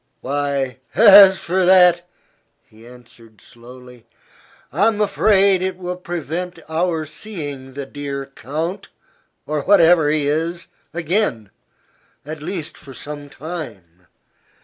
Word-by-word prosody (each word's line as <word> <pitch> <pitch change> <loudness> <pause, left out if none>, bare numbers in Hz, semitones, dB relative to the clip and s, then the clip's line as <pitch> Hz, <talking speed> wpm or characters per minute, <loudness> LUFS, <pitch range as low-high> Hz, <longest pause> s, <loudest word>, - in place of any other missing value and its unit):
"Why, 140 -2 -2 0.2
as 200 -3 +8
for 185 +3 -1
that," 180 -1 +5 0.6
he 110 +2 -18
answered, 120 -3 -17
slowly, 125 +1 -15 0.7
"I'm 215 0 +2
afraid 200 -2 +3
it 185 -1 -3
will 180 -1 -5
prevent 175 0 -5
our 160 0 -1
seeing 145 -6 -8
the 140 0 -6
dear 140 0 -6
count 160 +8 -5 0.6
or 150 -1 -2
whatever 170 -3 +4
he 150 -1 0
is 165 +3 -2 0.3
again, 165 - -2 0.7
at 155 0 -7
least 160 -1 -6
for 135 -2 -13
some 145 -1 -8
time. 100 - -9
155 Hz, 110 wpm, -19 LUFS, 135-180 Hz, 0.7 s, as